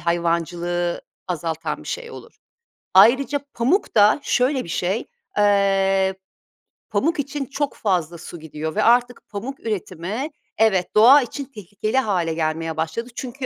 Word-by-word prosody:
hayvancılığı 170 +1 -1 0.3
azaltan 160 -2 -3
bir - - -10
şey 475 -1 -5
olur. - - -12 0.6
Ayrıca 275 +4 +5
pamuk 260 - +1
da 210 +6 +5
şöyle 260 +1 +1
bir - - -11
şey, 185 +7 -1 0.3
eee, 195 -1 +3 0.8
pamuk 290 - 0
için 280 0 -3
çok 285 +1 -3
fazla 175 -5 -1
su 170 +1 -9
gidiyor 160 0 -6
ve 215 - +2
artık 245 +1 +2
pamuk 235 +7 -6
üretimi 210 - -4 0.3
evet, 200 -5 +2
doğa 255 +7 +8
için 270 +3 -5
tehlikeli 215 0 -4
hâle 180 -9 +1
gelmeye 160 0 -2
başladı 165 +10 -3
çünkü 260 +1 -5
205 Hz, 135 wpm, -22 LUFS, 170-250 Hz, 0.8 s, doğa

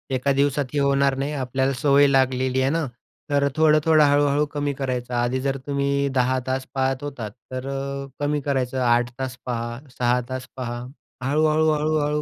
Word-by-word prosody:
एका 140 +2 +1
दिवसात 140 0 +1
हे 145 - +1
होणार 140 -1 +2
नाही, 140 +2 -2
आपल्याला 130 0 0
सवय 145 0 +5
लागलेली 130 -1 +2
आहे 130 - +2
ना, 165 -1 0 0.5
तर 140 0 +3
थोडं-थोडं 155 0 +4
हळू-हळू 145 +1 +3
कमी 145 -1 -1
करायचं. 125 -2 -3
आधी 120 +2 0
जर 135 0 -1
तुम्ही 140 0 0
10 130 +1 +2
तास 130 0 -1
पाहत 135 0 0
होतात, 125 -8 -5 0.2
तर 130 +1 -4 0.5
कमी 145 0 0
करायचं, 130 -2 -1
8 120 0 +2
तास 130 -1 -4
पहा, 120 0 -3 0.2
6 125 0 +2
तास 130 0 -5
पहा. 120 -2 -4 0.4
हळू-हळू, 155 +3 +2
हळू-हळू 150 0 0
135 Hz, 160 wpm, -23 LUFS, 130-145 Hz, 0.5 s, सवय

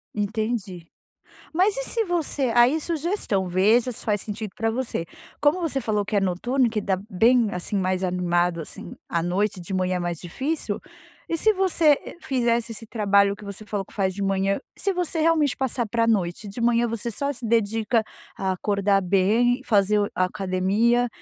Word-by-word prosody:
Entendi. 210 -4 -2 0.7
Mas 385 +7 +2
e - - -1
se 460 -2 +1
você 310 -7 0
aí, 245 +6 +5
sugestão, 315 - -1
veja 215 +8 +3
se 230 - -8
faz 210 -2 +1
sentido 210 -1 -5
pra 225 0 0
você. 230 -8 -3 0.4
Como 295 +5 +3
você 300 -5 -1
falou 210 -3 0
que 210 - -3
é - - +5
noturno, 235 +8 +1
que 215 -2 -2
dá 190 -2 -1
bem, 230 +3 +4
assim, 180 +2 -3
mais 185 0 0
animado, 175 -1 +1
assim, - - -9
à 170 - 0
noite, 190 +2 0
de 180 +3 -6
manhã 185 -1 0
mais 175 -2 -3
difícil, 270 - -3 0.5
e 330 - 0
se 435 +5 +4
você 340 -6 +3 0.2
fizesse 235 -3 0
esse 225 0 -9
trabalho 200 -2 +3
que 205 - -13
você 200 +1 -8
falou 205 -2 -3
que - - -19
faz 190 -2 0
de 200 +1 -4
manhã, 195 +1 +1 0.2
se 400 - 0
você 350 -2 -2
realmente 310 -3 +3
passar 255 -2 -1
pra 230 +1 +1
noite, 200 -2 0
de 200 +4 -8
manhã 235 0 +3
você 230 +1 -3
só 280 +6 -2
se 245 -3 -8
dedica 225 0 +1 0.3
a 190 -1 -1
acordar 200 +1 +1
bem, 215 +7 +2
fazer 210 -2 +3
o 205 - 0
a 185 - +2
academia, 195 +6 +1
215 Hz, 180 wpm, -24 LUFS, 190-245 Hz, 0.7 s, aí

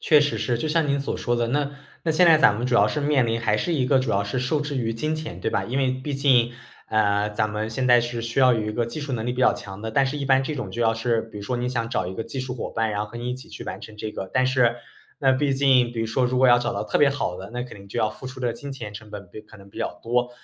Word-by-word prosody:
确 150 -2 +5
实 145 -1 0
是， 120 -2 0
就 155 - -2
像 155 -1 +1
您 140 0 +2
所 140 - -2
说 120 -1 -1
的， 120 -1 0
那 145 +1 -1 0.3
那 165 - 0
现 165 +3 +5
在 165 -2 +8
咱 105 -9 +5
们 120 +3 -2
主 125 - 0
要 105 -2 +5
是 150 - -2
面 145 -4 +2
临 115 0 -1
还 105 -2 +1
是 170 +10 -1
一 130 -5 +1
个 135 -1 +4
主 130 -3 -2
要 100 +1 +1
是 100 +5 -2
受 130 +4 0
制 145 -1 -3
于 115 -3 -1
金 155 +8 -1
钱， 155 - -6
对 - - -1
吧？ - - 0
因 130 +3 -2
为 130 -2 +2
毕 130 +3 -4
竟， 130 -4 +3 0.4
呃， 105 -1 +2
咱 105 +1 0
们 105 +1 -3
现 125 +3 -1
在 125 -1 +6
是 120 0 -3
需 115 +3 -1
要 130 -1 +6
有 115 -2 0
一 105 0 -3
个 120 +1 0
技 115 +7 -6
术 145 -2 -4
能 110 -2 -2
力 125 - -1
比 125 - -4
较 130 - +5
强 95 0 -8
的， 110 +1 -5
但 135 +4 +4
是 135 +2 -2
一 140 - -3
般 135 0 +4
这 150 +3 -3
种 110 -7 -4
就 120 - -1
要 115 -1 +3
是 115 0 0
比 110 -2 -10
如 100 - -7
说 125 +4 -2
您 125 +1 -2
想 115 -2 -2
找 105 -7 -1
一 95 - -5
个 110 - -4
技 135 - -5
术 130 -1 -4
伙 125 - -5
伴， 115 -1 0
然 105 -1 -2
后 105 - -2
和 120 - -9
您 120 +1 -4
一 125 - -1
起 130 - -11
去 - - -9
完 - - -6
成 110 -1 -11
这 110 0 -5
个， 95 - -6
但 130 0 +3
是 125 -2 +3 0.5
那 135 - +4
毕 135 +1 +2
竟 130 -3 +3
比 115 - -3
如 115 - -1
说 125 +3 +1
如 125 +1 -1
果 130 0 +5
要 120 0 +7
找 120 0 -2
到 - - -2
特 - - 0
别 145 - +6
好 135 -10 -2
的， 95 +3 -8
那 125 0 -3
肯 125 - -9
定 100 - -13
就 - - -3
要 110 - +1
付 130 - -8
出 130 0 -8
的 120 -2 0
金 140 +4 -7
钱 110 -6 -7
成 105 +1 -10
本 100 -3 -8
比 110 - -9
可 105 - -16
能 100 -1 -16
比 - - -11
较 - - -4
多。 120 +1 0
120 Hz, 365 characters per minute, -24 LUFS, 110-135 Hz, 0.5 s, 在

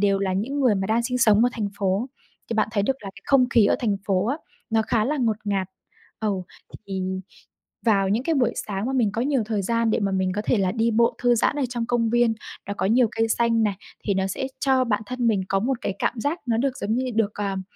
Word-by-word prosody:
đều 200 -1 +3
là 195 -1 0
những 255 +10 -2
người 245 -6 +4
mà 190 0 -1
đang 225 +2 +1
sinh 250 +1 -1
sống 220 -1 +5
ở 245 - +4
thành 210 -3 -2
phố, 195 +4 0 0.4
thì - - 0
bạn 215 -1 +2
thấy 200 -3 +1
được 265 +5 0
là 195 - -6
cái 200 - -15
không 255 -3 +4
khí 230 -5 +4
ở - - +3
thành 210 -5 0
phố 195 0 +1
á, 275 +5 0 0.3
nó 220 0 +3
khá 220 -1 +1
là 295 +6 0
ngột 230 -6 +1
ngạt. 195 -2 0 0.5
Ừ, 220 - 0 0.6
thì 190 -1 -3 0.8
vào 195 -3 +3
những 220 +5 +1
cái 325 +2 0
buổi 250 -4 +2 0.2
sáng 200 +2 -2
mà 265 - -1
mình 230 -6 +2
có 225 - -2
nhiều 270 -3 +1
thời 210 -3 -1
gian 230 +2 +1
để - - +1
mà 195 -2 0
mình 190 -1 0
có 210 - -2
thể 230 - +2
là 185 -1 +1
đi 230 0 +1
bộ 235 +1 +3
thư 245 -1 +4
giãn 235 - +1
ở 290 - 0
trong 235 -1 -3
công 230 -2 +1
viên 240 -1 +3 0.3
đó 200 - -3
có 190 - 0
nhiều 235 +2 +4
cây 225 0 0
xanh 230 0 +2
này, 205 -2 +1 0.3
thì 200 - +1
nó 190 0 0
sẽ 195 +7 -3
cho 265 -2 +3
bản 215 -3 0
thân 250 -1 -2
mình 210 -4 +2
có 195 0 +1
một 255 +2 -1
cái 195 - -2
cảm 240 - -1
giác 300 +7 -1
nó 230 - +1
được 260 +2 0
giống 215 +2 -1
như 255 +1 -1
được, 215 -2 +1
ờm, 195 -2 -2
225 Hz, 265 wpm, -24 LUFS, 200-245 Hz, 0.8 s, sống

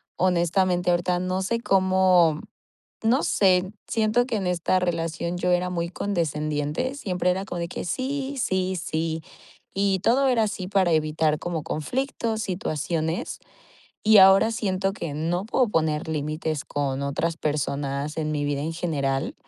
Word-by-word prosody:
honestamente, 180 0 +1
ahorita 175 +1 +1
no 185 +1 -1
sé 230 +5 -1
cómo. 185 -6 +3 0.7
no 250 +6 +3
sé, 185 0 +2
siento 225 +2 +1
que 250 - -3
en 190 -4 -1
esta 180 +1 +1
relación 170 0 -2
yo 180 0 +1
era 180 +1 +1
muy 170 -1 -2
condescendiente. 155 - -2
Siempre 180 -8 -1
era 190 +2 -1
como 175 -3 -5
de 170 - -3
que - - -5
sí, 270 +6 -2
sí, 185 0 0
sí, 165 -2 -2 0.5
y 195 -1 +1
todo 265 +6 +3
era 245 -4 +3
así 200 -3 -4
para 190 -2 +2
evitar 155 -1 +1
como 165 -1 -3
conflictos, 225 - -2
situaciones 165 -3 -2 0.7
y 215 -1 +7
ahora 195 +4 +7
siento 195 -4 -1
que 170 -7 -5
no 165 +5 -1
puedo 240 +2 +1
poner 160 -2 0
límites 155 0 -2
con 140 -1 -2
otras 160 +4 -1
personas 145 -1 -2
en 155 -1 -1
mi 150 -1 -1
vida 145 -1 -1
en 160 +3 -3
general 140 -5 -1
180 Hz, 150 wpm, -25 LUFS, 155-195 Hz, 0.7 s, y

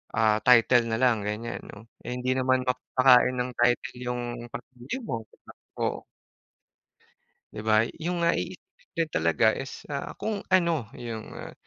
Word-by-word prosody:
ah, 110 -1 +3
title 120 -1 +5
na 110 - 0
lang 120 -5 +3
ganyan 115 +3 -4
no, 110 +2 -12 0.2
eh, 120 - -5
hindi 125 +1 -1
naman 130 0 +2
mapapakain 125 0 +4
ng 125 +1 -1
title 120 0 +2
yung 125 0 -2 0.3
pamilya 125 - -7
mo 115 - -2
di - - -25
ba? - - -10 0.3
Oo. - - -1 1.6
Di 105 - -5
ba, 110 +1 +4 0.2
yung 170 0 0
nga 170 - +4
i 175 - -2
i - - -33
din 165 -1 +1
talaga 85 +7 +3
is, 135 - -7
ah, 140 - -4
kung 215 -2 -2
ano 170 - +2
yung, 115 -2 -6
ah - - -8
125 Hz, 165 wpm, -27 LUFS, 115-130 Hz, 1.6 s, title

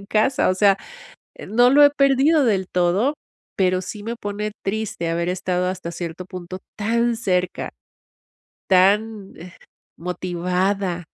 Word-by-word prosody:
en 200 - -13
casa. 220 +7 +2
O 185 - +2
sea, 195 0 +4 0.6
eh, - - -10
no 245 +3 +4
lo 290 +2 +7
he 285 - +7
perdido 280 +2 +3
del 190 -4 0
todo, 180 +10 +2 0.4
pero 185 -1 +1
sí 205 +3 -7
me 230 +3 -4
pone 210 0 -4
triste 195 -5 -2
haber 170 +1 -1
estado 180 0 -1
hasta 185 -2 -5
cierto 170 +1 -6
punto 185 -1 -8 0.2
tan 235 +2 +1
cerca, 185 -5 -1 1.0
tan, 200 +2 +2
eh, 175 +2 -11 0.5
motivada, 180 +1 -2
195 Hz, 140 wpm, -21 LUFS, 180-220 Hz, 1.0 s, lo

